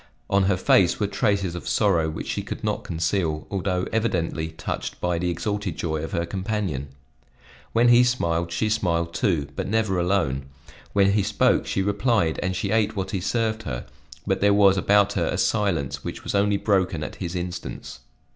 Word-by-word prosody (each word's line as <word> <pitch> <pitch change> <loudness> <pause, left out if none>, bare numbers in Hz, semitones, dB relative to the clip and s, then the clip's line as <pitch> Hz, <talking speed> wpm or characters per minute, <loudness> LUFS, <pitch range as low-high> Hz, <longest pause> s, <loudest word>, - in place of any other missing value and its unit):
On 100 -1 +4
her 95 -1 +2
face 90 -1 +3
were 105 - +1
traces 100 -3 0
of 90 - -7
sorrow 85 -7 +2
which 80 - -5
she - - -2
could - - -7
not - - -1
conceal, 80 -1 -1
although 95 -2 -1
evidently 85 -8 0
touched 80 0 -5
by 90 -1 0
the 90 +1 0
exalted 100 0 -3
joy 80 -2 -2
of 80 - -5
her 85 - -1
companion. 95 - -3 0.9
When 120 +1 +4
he 120 +1 +7
smiled, 85 -9 0
she 110 - 0
smiled 85 -6 0
too, 85 - 0
but - - -3
never 110 -3 +1
alone; 85 -8 0 0.5
when 100 -1 +4
he 105 +1 +2
spoke, 100 - +2
she 95 - 0
replied 105 -4 +1
and 95 0 -1
she 100 +1 -2
ate 110 -1 +1
what 95 -2 -3
he 95 - -2
served 110 +2 0
her; 60 - -5 0.4
but - - 0
there 100 0 +4
was 100 -2 +6
about 100 +1 +3
her 85 -5 0
a - - -1
silence 90 - 0
which - - -6
was - - -4
only 100 0 +2
broken 95 -7 +1
at - - -7
his 90 -1 -4
instance. 90 0 -6
95 Hz, 185 wpm, -24 LUFS, 85-105 Hz, 0.9 s, he